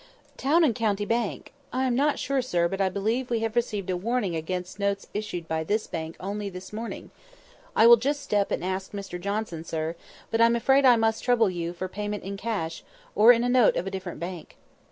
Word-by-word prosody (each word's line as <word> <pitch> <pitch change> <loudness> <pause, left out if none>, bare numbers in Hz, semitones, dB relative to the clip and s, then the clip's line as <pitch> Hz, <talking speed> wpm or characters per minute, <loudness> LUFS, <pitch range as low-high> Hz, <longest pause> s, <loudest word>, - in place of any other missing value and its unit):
"Town 315 +6 +3
and 275 -7 +4
County 210 -3 0
Bank! 230 -1 -2 0.2
I 260 +1 0
am 255 - +1
not 285 +4 +2
sure, 275 -1 0
sir, 175 -9 +1
but 195 +2 -3
I 190 - +3
believe 220 +7 -1
we 230 -2 0
have 225 0 -2
received 210 -5 -1
a - - 0
warning 205 -1 -1
against 180 +4 -4
notes 200 0 -1
issued 200 -5 -4
by 160 0 -1
this 210 +6 0
bank 160 -1 -5
only 200 +2 -4
this 185 +2 -10
morning. 225 +2 -6 0.6
I 220 - +6
will 235 0 +9
just 285 +5 -1
step 205 -5 +1
and - - -2
ask 190 +1 -3
Mr 195 -3 -6
Johnson, 200 -4 -3
sir; 160 0 -3 0.4
but 225 - +2
I'm 230 0 +5
afraid 270 +4 +4
I 250 -2 +8
must 225 -1 +1
trouble 235 -5 +3
you 170 -1 -3
for 180 +2 -5
payment 205 +1 -4
in 195 +1 -5
cash, 195 -6 -3 0.3
or 220 +4 +8
in 235 -1 +3
a - - +1
note 245 -3 +4
of 180 - -1
a 195 - -4
different 190 -2 -6
bank." 175 -1 -7
205 Hz, 215 wpm, -26 LUFS, 185-235 Hz, 0.6 s, will